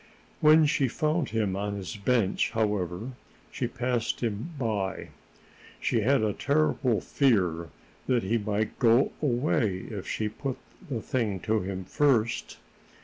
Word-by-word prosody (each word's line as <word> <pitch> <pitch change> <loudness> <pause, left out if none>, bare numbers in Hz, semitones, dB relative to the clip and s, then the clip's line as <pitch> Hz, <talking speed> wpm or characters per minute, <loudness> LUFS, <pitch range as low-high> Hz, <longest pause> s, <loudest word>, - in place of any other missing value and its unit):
When 155 +1 +6
she 145 -2 +2
found 155 +3 0
him 105 -4 0
on 100 +1 -2
his 100 +2 -6
bench, 105 -1 +1
however, 105 0 -1 0.4
she 125 - -2
passed 120 -1 -2
him 115 +4 -2
by. 105 -7 -2 0.7
She 115 - +1
had 130 +2 +3
a 105 -1 +1
terrible 140 -7 +1
fear 90 - +1 0.4
that 125 -3 +2
he 115 +5 +1
might 105 0 -2
go 120 +2 +4
away 120 -8 +1
if 100 -4 -6
she 110 - -1
put 130 +5 -4 0.3
the 120 -5 -3
thing 110 -7 -1
to 110 0 +1
him 95 -1 -4
first. 115 0 +1
115 Hz, 140 wpm, -28 LUFS, 100-130 Hz, 0.7 s, When